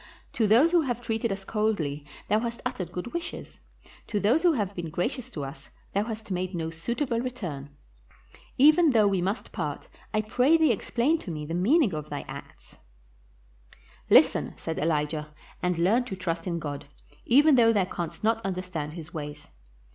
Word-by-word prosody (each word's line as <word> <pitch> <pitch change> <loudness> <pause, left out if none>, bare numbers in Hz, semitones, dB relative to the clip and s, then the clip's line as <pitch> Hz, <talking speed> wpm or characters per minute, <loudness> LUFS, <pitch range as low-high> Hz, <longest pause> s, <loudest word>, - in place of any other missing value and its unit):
To 220 - +2
those 245 +11 +5
who 350 -1 +5
have 245 -5 -2
treated 230 -2 -2
us 195 0 -5
coldly 170 -11 -1 0.2
thou 215 - +3
hast 235 0 -4
uttered 175 -3 -3
good 180 +6 -6
wishes; 340 0 -6 0.5
to 210 - -1
those 225 +11 +3
who 350 -1 +4
have 205 -7 -1
been 175 -3 -5
gracious 225 - -3
to 145 - -5
us 135 +1 -10 0.2
thou 200 +2 +1
hast 220 -2 -6
made 185 0 -2
no 160 -1 -3
suit 235 - -2
able 240 -4 -1
return. 180 - -5 0.9
Even 310 +4 +6
though 220 -3 +5
we 195 -2 +1
must 195 +6 -2
part, 150 -7 -4 0.2
I 215 - +1
pray 250 +9 +3
thee 315 -4 +4
explain 245 - +1
to 200 - -9
me 150 -2 -4
the 165 - -5
meaning 220 - +3
of 150 -1 -5
thy 145 - -4
acts." - - -11 1.3
"Listen," - - +5
said 160 - -4
Elijah, 150 -1 -1 0.3
"and 180 -1 0
learn 200 +9 +3
to 195 - -5
trust 170 -2 -3
in 170 -1 -1
God, 145 -3 -5 0.4
even 290 +5 +6
though 235 -3 +6
thou 200 -4 +2
canst 175 -1 -5
not 225 +1 +2
understand 180 -5 -4
his 165 0 -9
ways. 150 -2 -7
195 Hz, 180 wpm, -27 LUFS, 165-235 Hz, 1.3 s, Even